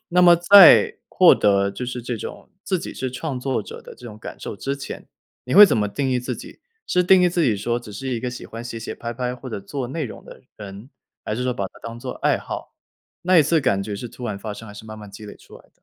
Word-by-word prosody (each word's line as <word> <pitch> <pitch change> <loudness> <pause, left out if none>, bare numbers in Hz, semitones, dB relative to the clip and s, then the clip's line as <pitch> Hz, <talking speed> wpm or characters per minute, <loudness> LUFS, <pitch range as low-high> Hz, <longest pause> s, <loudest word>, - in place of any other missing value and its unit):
那 180 +1 +3
么 175 -1 +7
在 180 +1 +7
获 - - +6
得 100 -1 +2
就 115 +6 -6
是 125 -1 -5
这 120 -1 -4
种 - - -9
自 185 -2 -1
己 - - -7
是 130 -1 -4
创 130 0 -5
作 130 -5 -1
者 - - -10
的 - - -12
这 120 - -13
种 105 -1 -10
感 - - -9
受 - - -6
之 140 +5 -3
前， 140 - -9 0.4
你 125 - -3
会 210 +1 +11
怎 185 - +2
么 105 -1 0
定 135 +4 -2
义 125 - +1
自 125 - -4
己？ - - -12 0.3
是 180 - +2
定 185 +1 +5
义 180 - +5
自 175 -1 0
己 115 -8 +2
说 120 +4 -2
只 105 -3 -11
是 135 +6 -6
一 120 -3 -2
个 125 0 -3
喜 125 - -9
欢 115 +1 -8
写 115 -1 -6
写 115 - -6
拍 115 0 -6
拍 125 +1 -3
或 125 +1 -10
者 110 - -4
做 125 +5 -5
内 155 +2 -3
容 115 - -9
的 - - -14
人？ 105 +5 -10 0.3
还 105 - -3
是 125 - -3
说 125 0 0
把 100 - -4
它 - - -16
当 115 0 -7
做 125 0 -6
爱 - - 0
好？ - - -8 0.5
那 185 0 +3
一 - - +7
次 155 +2 +2
感 100 -7 +1
觉 100 0 -5
是 120 - -7
突 120 +2 -10
然 105 -4 -4
发 105 0 -6
生， 110 0 -11
还 - - -10
是 105 +1 -11
慢 110 0 -9
慢 105 -2 -11
积 105 +2 -11
累 - - -11
出 - - -16
来 - - -20
的？ - - -26
125 Hz, 305 characters per minute, -22 LUFS, 110-140 Hz, 0.5 s, 会